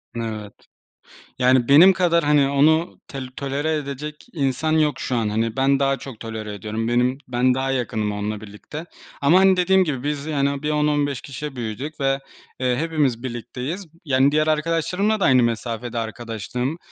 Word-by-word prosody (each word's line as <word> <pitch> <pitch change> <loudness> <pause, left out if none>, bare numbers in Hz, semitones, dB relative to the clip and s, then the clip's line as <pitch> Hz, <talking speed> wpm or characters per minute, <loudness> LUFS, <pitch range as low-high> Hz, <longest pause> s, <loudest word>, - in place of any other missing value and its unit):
N - - -3
evet. 105 -2 -6 0.9
Yani, 125 -1 +4
benim 170 +7 +8
kadar, 170 -3 +2
hani, 145 -2 +3
onu 155 +4 +2
tel 135 -1 -6
tolere 145 +3 -1
edecek 150 +1 -6
insan 145 0 0
yok 155 -2 +2
şu 125 - -2
an. 110 -3 0
Hani, 110 +1 -1
ben 135 +1 +3
daha 135 0 +2
çok 135 -5 -10
tolere 110 -2 -6
ediyorum. 110 +3 -4
Benim 125 +2 +2
ben 125 +1 +2
daha 135 +1 -1
yakınım 115 -5 -1
onunla 105 +1 -3
birlikte. 110 +10 -9 0.4
Ama, 160 +6 +5
hani, 190 -1 +5
dediğim 190 +1 +4
gibi 145 -7 -3
biz, 145 -1 -2
yani, 140 -2 -1
bir 150 - 0
10-15 150 -2 +1
kişi 140 +1 -7
büyüdük 125 +7 -5
ve, 135 0 +1 0.4
eee, 125 -1 +1
hepimiz 145 -6 0
birlikteyiz. 130 - -5
B - - -23
yani, 135 0 +3
diğer 155 +1 +2
arkadaşlarımla 165 +7 +1
da 195 - +2
aynı 130 -2 +5
mesafede 115 +1 -2
arkadaşlığım. 115 +5 -4
135 Hz, 170 wpm, -22 LUFS, 120-150 Hz, 0.9 s, benim